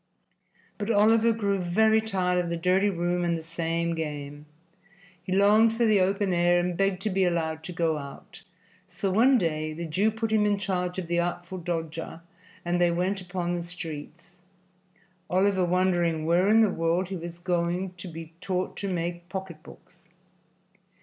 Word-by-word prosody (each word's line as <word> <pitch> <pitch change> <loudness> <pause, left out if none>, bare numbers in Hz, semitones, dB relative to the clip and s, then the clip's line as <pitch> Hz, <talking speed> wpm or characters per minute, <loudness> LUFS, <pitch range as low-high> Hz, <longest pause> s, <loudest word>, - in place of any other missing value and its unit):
But 205 +1 -3
Oliver 225 +2 +4
grew 200 -3 0
very 220 +5 +3
tired 180 -4 0
of 170 - -4
the 170 - -2
dirty 185 +4 +2
room 175 -1 -1
and 170 -1 0
the 160 - -8
same 170 0 -2
game. 150 -2 -5 0.7
He 180 - -8
longed 210 +4 +5
for 235 +1 +1
the 215 -3 +4
open 195 +1 +1
air 175 0 +3
and 175 0 -1
begged 195 +1 0
to 215 - -1
be 190 0 +2
allowed 160 -3 -1
to 180 - -6
go 165 -3 0
out; 140 -1 -11 0.5
so 190 +1 -3
one 250 +7 +5
day 155 -5 -1
the 170 +2 -5
Jew 185 +7 +1
put 225 0 -3
him 215 -1 +3
in 205 -1 +2
charge 180 -2 -2
of 185 - -3
the 170 +1 0
Artful 175 +1 -3
Dodger 165 -1 -4 0.4
and 175 +1 0
they 175 - +5
went 185 +3 -1
upon 175 -1 -3
the 175 - -2
streets, 170 0 -8 0.9
Oliver 190 0 +2
wondering 175 -3 +1
where 175 +4 +3
in 220 +1 +6
the 215 -3 +3
world 170 +2 0
he 195 - -4
was 170 -1 -7
going 175 +1 -1
to 180 - -8
be 165 -1 -9
taught 185 0 -2
to 200 - -3
make 175 0 -4
pocketbooks. 190 -5 -10
180 Hz, 175 wpm, -27 LUFS, 170-195 Hz, 0.9 s, in